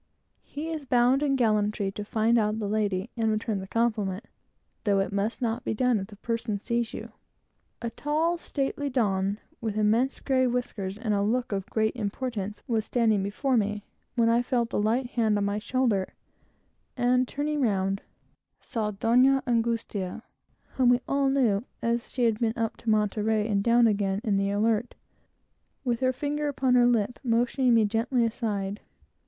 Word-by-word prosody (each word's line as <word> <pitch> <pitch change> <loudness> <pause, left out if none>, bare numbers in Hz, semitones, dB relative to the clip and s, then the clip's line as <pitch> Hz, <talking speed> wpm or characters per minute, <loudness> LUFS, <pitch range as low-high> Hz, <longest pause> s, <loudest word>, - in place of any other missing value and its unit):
He 305 +3 -6
is 315 -2 -4
bound 250 +2 +3
in 280 -2 +2
gallantry 210 -4 +1
to 205 +1 -6
find 225 +2 +2
out 215 0 0
the 215 -2 -2
lady 205 0 -1
and 225 -2 +1
return 215 -1 -1
the 190 - -7
compliment, 215 -3 -1 0.6
though 200 -3 +2
it 195 - -1
must 205 +6 -2
not 230 +1 -1
be - - -2
done 250 -1 +2
if 195 - -5
the 205 - -13
person 230 0 -2
sees 235 +1 -1
you. - - -7 0.7
A 235 - -2
tall, 315 +7 0
stately 285 -2 -2
Don, 200 -6 0 0.2
with 220 -2 -3
immense 225 +5 +2
grey 260 -2 +2
whiskers, 215 -6 -3
and 220 -2 -1
a 200 - +1
look 240 +4 0
of 195 -1 -3
great 220 +1 0
importance, 210 -2 -4
was 225 -3 +1
standing 220 -3 +2
before 230 +7 0
me, 210 -1 -1 0.3
when 230 -2 +3
I 230 +1 +4
felt 240 -1 -1
a - - +1
light 225 +5 +1
hand 220 -3 +2
on 200 - 0
my 200 +1 -1
shoulder, 230 -4 0 0.8
and 250 +1 +2
turning 295 +2 -2
round, 195 -4 0 0.6
saw 220 -2 -3
Donna 250 +6 +3
Angustia, 230 -4 -1 0.5
(whom 255 -2 +4
we 245 0 +4
all 275 0 +2
knew, 240 -7 +2 0.2
as 235 0 0
she 250 - -2
had 225 -2 +2
been 230 -1 0
up 230 0 -1
to 235 - -4
Monterey, 215 0 +1
and 200 -2 +1
down 235 +1 +5
again, 200 -3 +1
in 210 -5 +1
the 195 0 +1
Alert,) 220 +3 0 0.9
with 240 -3 0
her 255 -1 +2
finger 295 +3 -2
upon 265 -3 +1
her 245 -1 +5
lip, 235 -1 +1
motioning 245 +1 +2
me 225 -2 +4
gently 230 +3 +1
aside. 210 -3 -2
230 Hz, 175 wpm, -27 LUFS, 210-250 Hz, 0.9 s, down